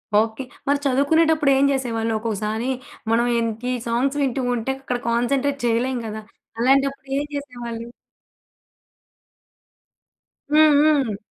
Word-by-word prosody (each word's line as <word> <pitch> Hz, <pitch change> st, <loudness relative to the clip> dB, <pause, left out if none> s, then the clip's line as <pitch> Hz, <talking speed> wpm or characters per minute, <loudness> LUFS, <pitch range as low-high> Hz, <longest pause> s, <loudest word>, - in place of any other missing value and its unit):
Okay. 220 Hz, +4 st, +1 dB, 0.2 s
మరి 285 Hz, 0 st, +2 dB
చదువుకునేటప్పుడు 295 Hz, +2 st, +3 dB
ఏం 275 Hz, -, +3 dB
జేసేవాళ్ళు. 230 Hz, -4 st, -1 dB
ఒక్కొక్కసారి 220 Hz, +2 st, -2 dB, 0.4 s
మనం 235 Hz, +1 st, +3 dB, 0.2 s
ఎంతి 230 Hz, +2 st, -2 dB, 0.2 s
సాంగ్స్ 265 Hz, +5 st, 0 dB
వింటూ 265 Hz, 0 st, -1 dB
ఉంటే 235 Hz, +3 st, -2 dB
అక్కడ 250 Hz, -2 st, -2 dB
కాన్సంట్రేట్ 275 Hz, +4 st, 0 dB
చేయలేం 240 Hz, +2 st, +1 dB
గదా. 215 Hz, 0 st, -6 dB, 0.4 s
అలాంటప్పుడు 275 Hz, +2 st, +2 dB
ఏం 290 Hz, -, -2 dB
చేసేవాళ్ళు? 240 Hz, -4 st, -6 dB, 2.7 s
హ్మ్, 310 Hz, -1 st, +6 dB
హ్మ్. 275 Hz, -9 st, +2 dB
255 Hz, 105 wpm, -22 LUFS, 230-275 Hz, 2.7 s, హ్మ్